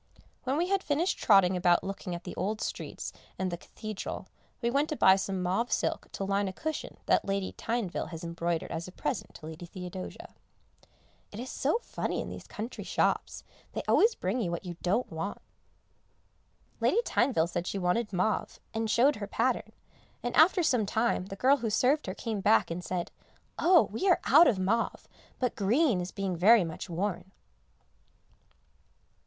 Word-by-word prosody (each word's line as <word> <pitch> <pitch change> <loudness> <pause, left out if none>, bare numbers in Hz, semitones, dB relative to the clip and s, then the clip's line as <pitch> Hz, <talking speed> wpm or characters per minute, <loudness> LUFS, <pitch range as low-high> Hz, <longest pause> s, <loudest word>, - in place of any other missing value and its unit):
When 265 +2 0
we 350 +3 0
had 395 -1 +2
finished 320 +4 0
trotting 195 -3 +5
about 175 -1 +3
looking 190 -2 -4
at 170 - -8
the - - -7
old 210 +3 -2
streets - - -5 0.2
and 190 -1 -1
the - - -1
Cathedral, 215 +3 -6 0.3
we 235 -1 0
went 285 +4 +1
to 305 - -1
buy 190 -8 +6
some 190 -1 -2
mauve 195 +7 0
silk - - -1
to - - -3
line 200 +1 0
a 190 - -4
cushion 315 +9 -4
that - - +3
Lady 195 -1 -1
Tyneville 225 -6 -2
has 165 -1 -7
embroidered 170 0 -2
as 165 +2 -4
a - - -9
present - - -4
to 155 - -10
Lady 160 +2 -8
Theodosia. 180 +1 -8 1.0
It 210 - -8
is 250 +2 -5
so 290 +10 +1
funny - - -3
in - - -4
these - - -9
country 225 +4 -6
shops, - - 0 0.3
they - - -3
always 450 +2 +5
bring 200 +7 -1
you 185 - -1
what 170 +2 -4
you 175 -1 -5
don't 200 +8 0
want. 165 +5 -4 1.4
Lady 470 - +3
Tyneville 240 - +2
said 175 +1 -3
she - - -2
wanted 195 +4 0
mauve, 190 +3 -1
and 225 0 -1
showed 260 +6 +4
her 205 -1 -5
pattern, - - 0 0.5
and 245 0 -2
after 345 +3 +6
some 245 -9 +2
time 220 -3 0
the 195 - -6
girl 265 +7 +4
who 235 -4 -2
served 260 +7 +2
her 185 - -3
came 220 -3 -3
back 110 - +4
and 175 +2 -4
said, 180 -2 -3 0.5
"Oh! 345 -1 +6
we 375 - 0
are 355 - +5
out 315 +6 +7
of 215 - +3
mauve, 210 +5 -1 0.3
but 250 -2 -1
green 225 - +2
is 180 - -5
being 195 -2 -2
very 205 +5 +6
much 165 +1 -6
worn." 180 +1 -3
200 Hz, 180 wpm, -29 LUFS, 180-245 Hz, 1.4 s, out